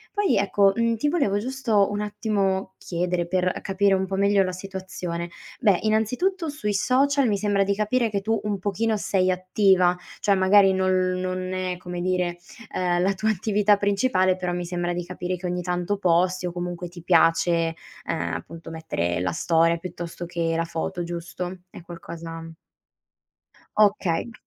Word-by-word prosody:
Poi, 410 -2 +2
ecco, 200 0 +3
mhmm, 230 0 +1
ti 295 +6 0
volevo 245 - +1
giusto 225 -5 +1
un 205 0 -3
attimo 200 -3 -1
chiedere, 175 0 -2
per, 185 0 0
uhm, - - -6
capire 195 0 +2
un 190 0 0
po' 195 - -7
meglio 200 0 +3
la 185 - -2
situazione. 185 -2 -5 0.3
Beh, 200 -6 +3
innanzitutto, 250 - 0
sui 210 -8 -2
social 265 +5 +2
mi 205 - +2
sembra 200 -1 +1
di 200 +1 +1
capire 220 +2 0
che 200 -1 -1
tu 220 +1 0
un 205 -2 -2
pochino 215 +3 0
sei 185 -2 +1
attiva, 185 -1 +3 0.2
cioè 200 -2 +3
magari 190 +1 +5
non 185 0 +1 0.3
non 185 0 -3
è, 185 -1 -2
come 180 -1 -6
dire, 180 -1 0 0.4
uhm, 175 -1 +1
la 195 +2 +2
tua 215 +3 0
attività 210 +1 +2
principale, 200 -2 +2
però 180 -1 -3
mi 175 0 -3
sembra 175 0 -2
di 175 - -3
capire 180 +1 -4
che 180 +1 -5
ogni 180 0 -2
tanto 180 +3 -1
posti 180 0 +2
o 175 - -2
comunque 175 0 -5
ti 175 -1 -11
piace, 165 -1 +3 0.3
ehm, 85 0 -2
appunto, 165 - -8
mettere 90 - -2
la 90 -1 -1
storia, 165 - +2
piuttosto 175 0 -7
che 170 -1 -1
la 165 0 0
foto, 170 +1 -4
giusto? 175 +1 -6
È - - -10
qualcosa 165 -1 -8 1.2
Okay. 205 0 +2
185 Hz, 170 wpm, -24 LUFS, 175-205 Hz, 1.2 s, magari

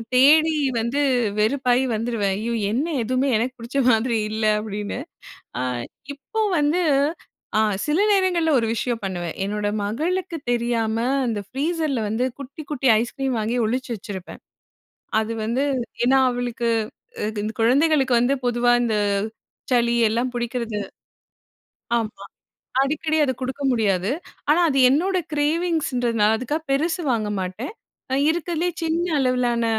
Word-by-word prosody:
தேடி 310 +5 +6 0.2
வந்து 235 +6 -1 0.4
வெறுப்பாயி 250 +3 +2
வந்துருவேன். 220 -3 -1
ஐயோ 230 +2 -2 0.2
என்ன 255 +7 0 0.2
எதுவுமே 255 +4 0
எனக்கு 245 +4 -1
பிடிச்ச 240 +4 -3
மாதிரி 225 +1 +2
இல்ல 220 0 -1
அப்படின்னு. 210 -1 -4 0.6
அ - - 0 0.5
இப்போ 440 +11 -5 0.2
வந்து 295 +5 +2 0.8
அ - - +5 0.2
சில 300 +5 +1
நேரங்கள்ல 370 -5 +2
ஒரு 230 - +1
விஷயம் 235 0 -2
பண்ணுவேன். 175 -3 -3
என்னோட 205 +1 -2
மகளுக்கு 335 - -2
தெரியாம 235 -2 0 0.3
அந்த 225 -3 -1
ஃப்ரீசர்ல 300 -1 -1
வந்து 220 +4 0
குட்டி 280 +3 -8
குட்டி 275 -3 0
ஐஸ்கிரீம் 260 +2 -2
வாங்கி 220 +3 -1
ஒளிச்சு 255 +2 -2
வச்சிருப்பேன். 190 -3 -8 0.8
அது 220 +1 -2
வந்து 235 +5 0 0.4
ஏன்னா, 265 +2 +5
அவளுக்கு 245 -1 -2 0.5
இ - - +1 0.2
இந்த 215 - -2
குழந்தைகளுக்கு 265 +1 +3
வந்து 245 +4 +2
பொதுவா 240 0 +2
இந்த 225 -3 +1 0.8
சளி 235 -1 +3
எல்லாம் 240 +3 -1
புடிக்கிறது 235 -3 -2 1.2
ஆமா. 220 -1 -6 0.6
அடிக்கடி 310 +3 0
அத 260 - 0
கொடுக்க 260 +3 -4
முடியாது. 200 -4 +1 0.4
ஆனா 315 +4 +5
அது 275 -2 +1
என்னோட 370 +7 +2 0.2
கிரேவிங்ஸ்ன்றதுனால 290 -8 +1
அதுக்காக 290 +7 -3
பெருசு 320 +5 +1
வாங்க 215 -3 -1
மாட்டேன். 185 - -5 0.6
இருக்கதிலேயே 345 +1 -1
சின்ன 330 +2 0
அளவிலான 250 -3 +1
245 Hz, 125 wpm, -23 LUFS, 225-295 Hz, 1.2 s, தேடி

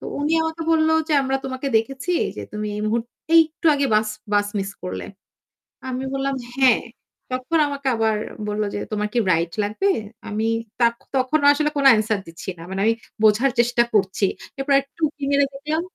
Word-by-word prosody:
তো - - -11 0.2
উনি 300 +2 0
আমাকে 320 0 -3
বলল 315 0 +3 0.2
যে, - - 0
"আমরা 265 0 0
তোমাকে 260 +1 -4
দেখেছি 270 +9 -1 0.2
যে - - -5
তুমি 210 0 -3
এই 210 - -3
মুহূর 225 +2 +1 0.3
একটু 320 0 +3
আগে 280 -1 +1
বাস 215 0 +3 0.2
বাস 205 0 +3
মিস 195 0 -2
করলে।" 180 - -4 0.8
আমি 255 +1 -3
বললাম, 275 0 -1 0.2
"হ্যাঁ।" 260 -4 +4 0.5
তখন 255 +6 0
আমাকে 280 -1 -3
আবার 220 -1 +1 0.3
বলল 210 +1 -1
যে - - -2
"তোমার 210 0 -1
কি - - +2
রাইড 170 0 0
লাগবে?" 215 - 0 0.4
আমি 220 +1 -1 0.3
তাখ 235 0 +4 0.2
তখনো 285 +3 +1
আসলে 300 +1 0
কোনো 280 - +2
answer 215 0 0
দিচ্ছি 165 +3 -11
না। - - -10
মানে 190 +1 -3
আমি 225 +1 +4 0.3
বোঝার 220 +5 +4
চেষ্টা 240 0 +3
করছি। 195 0 +2 0.3
এরপর 275 +1 +1
একটু 275 +4 -25
উঁকি 290 -1 -8
মেরে 280 0 +4
দেখলাম 305 +4 -2
255 Hz, 180 wpm, -22 LUFS, 215-285 Hz, 0.8 s, হ্যাঁ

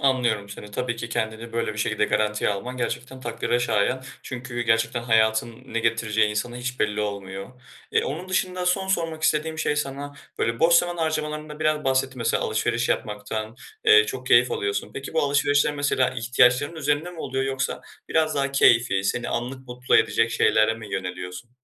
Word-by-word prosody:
Anlıyorum 120 -7 +1
seni. 105 +1 -9
Tabii 120 +2 -2
ki 115 0 -5
kendini 110 +1 -3
böyle 115 -1 -1
bir 110 - -9
şekilde 110 0 +1
garantiye 105 0 +1
alman 105 +6 -4
gerçekten 130 +1 -4
takdire 120 0 -1
şayan 120 +2 +1 0.2
çünkü 125 -1 -6
gerçekten 115 +1 +1
hayatın 110 +1 +1
ne 115 - -3
getireceği 110 -2 +1
insana 120 +3 -3
hiç 125 +1 -5
belli 105 0 +1
olmuyor. 100 -2 -5 0.4
Eee, - - +3
onun 170 +7 -5
dışında 185 -1 -1
son 190 +1 +1
sormak 165 -4 -1
istediğim 160 0 +1
şey 150 - 0
sana 145 0 -4 0.2
böyle 115 0 -1
boş 170 +1 +5
zaman 175 0 +3
harcamalarında 155 -1 -3
biraz 155 -1 +1
bahsetti 130 -1 +1
mesela 115 0 +1
alışveriş - - 0
yapmaktan, 110 +2 -3 0.3
eee, 435 0 +7
çok 410 -2 -6
keyif - - +5
alıyorsun. 415 -2 -2
Peki 135 - -6
bu 160 - +3
alışverişler 145 +1 +2
mesela 140 -3 +1
ihtiyaçların 125 +5 +2
üzerinde 150 +3 0
mi 170 - -12
oluyor 135 -1 -2
yoksa 135 0 -2 0.3
biraz 155 -1 +2
daha 140 -1 0
keyfî 115 -7 +4
seni 120 +4 -1
anlık 130 +2 -4
mutlu 125 +1 +2
edecek 115 0 +2
şeylere 110 -1 +3
mi 105 -3 -10
yöneliyorsun? 90 +3 -5
125 Hz, 170 wpm, -24 LUFS, 110-150 Hz, 0.4 s, eee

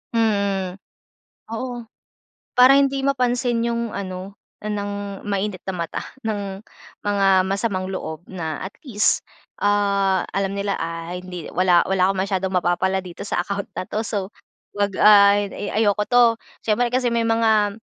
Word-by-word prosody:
Mm. 200 -4 +1 0.8
Oo. 240 0 -4 0.7
Para 255 +2 +8
hindi 275 -1 +1
mapansin 245 -3 +1
'yung 235 -1 -1
ano, 190 0 -6 0.3
ng 205 -1 -4
mainit 200 -2 -2
na 190 - -3
mata, 170 -1 -3 0.2
ng 200 -2 -3 0.4
mga 195 -2 +3
masamang 195 -2 -1
loob 160 -4 -5
na 160 -5 -4
at 190 - -5
least, 215 -5 +1 0.3
ah, 200 -2 +2
alam 195 0 -1
nila, 200 0 -1
"Ah 165 +1 -4
hindi, 180 -2 -7
wala-wala 185 +1 +3
akong 190 -1 0
masyadong 190 -1 -2
mapapala 190 +2 +1
dito 180 +2 -8
sa - - 0
account 200 0 -3
na - - -2
to, 215 - -2
so 200 -3 -3 0.5
'wag, 205 -1 +1
ah, 200 -1 +8
a-ayoko 205 +1 0
to." 245 -1 +5 0.4
Siyempre 230 +3 +2
kasi 250 -1 +2
may 230 -1 +1
mga 220 -2 +3
200 Hz, 140 wpm, -22 LUFS, 190-220 Hz, 0.8 s, Para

